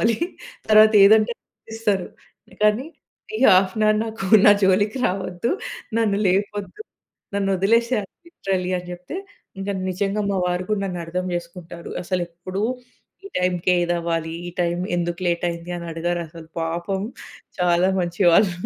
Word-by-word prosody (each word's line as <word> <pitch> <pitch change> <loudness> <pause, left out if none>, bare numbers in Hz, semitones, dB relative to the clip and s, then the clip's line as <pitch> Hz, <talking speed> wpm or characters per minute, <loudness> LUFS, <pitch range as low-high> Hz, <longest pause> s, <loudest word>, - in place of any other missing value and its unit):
కావాలి. 225 0 +2 0.5
తర్వాత 215 0 +7
ఏదంటే 215 +3 +5
చేపిస్తారు. 220 -4 -3 0.6
కానీ 215 +6 +3 0.5
"ఈ - - -4
హాఫ్ 185 0 +4
అన్ 215 - +2
అవర్ 215 0 +3
నాకు 220 -3 -6 0.2
నా - - +10
జోలికి 205 +5 +2
రావద్దు. 185 +2 -2 0.5
నన్ను 205 -3 +1
లేపొద్దు. 205 - -1 0.5
నన్ను 200 -1 0
వదిలేసాయి 230 +3 +2 0.2
లిటరల్లి" 190 - -2
అని 180 0 -9
చెప్తే, 180 - -7 0.4
ఇంకా 200 +1 -2 0.2
నిజంగా 195 +3 -1
మా 195 - 0
వారు 180 +1 -1
కూడా 210 -2 +1
నన్ను 180 -2 -4
అర్థం 180 +2 -3
చేసుకుంటారు. 170 0 -7
అసలు 180 +1 -1
ఎప్పుడు 185 +4 -5 0.6
ఈ - - -7
టైమ్‌కే 180 0 +1
ఇదవ్వాలి. 170 -1 -1 0.2
ఈ - - -5
టైమ్ 175 0 0
ఎందుకు 175 0 -2
లేట్ 170 0 -1
అయింది? 170 +1 -7
అని 170 - -7
అడిగరసలు. 165 -1 -4
పాపం 170 +4 -2 0.6
చాలా 180 +1 +3
మంచివాళ్ళు. 175 +2 +3
185 Hz, 140 wpm, -22 LUFS, 175-205 Hz, 0.6 s, నా